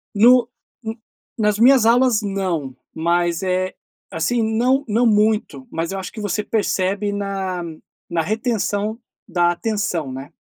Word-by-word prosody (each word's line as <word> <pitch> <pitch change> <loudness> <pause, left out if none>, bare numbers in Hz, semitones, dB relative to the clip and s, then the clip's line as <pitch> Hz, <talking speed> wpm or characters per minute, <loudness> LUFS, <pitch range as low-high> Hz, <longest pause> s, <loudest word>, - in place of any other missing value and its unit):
No 240 +3 +6 0.4
um 220 0 -3 0.4
nas 210 -2 +1
minhas 250 -1 +6
aulas 240 -1 +4
não. 185 -10 -2 0.2
Mas 170 +1 0
é, 185 0 0 0.4
assim, 245 -1 0
não 250 +6 +1
não 230 +3 +2
muito. 210 -10 +1
Mas 165 +2 -3
eu 195 - -3
acho 185 - -6
que 220 - -8
você 210 +1 -1
percebe 200 -1 0
na 195 -3 -3 0.5
na 170 -1 0
retenção 215 +1 -1 0.3
da 175 -2 +2
atenção, 175 - -2
né. 135 +2 -8
205 Hz, 140 wpm, -20 LUFS, 175-225 Hz, 0.5 s, No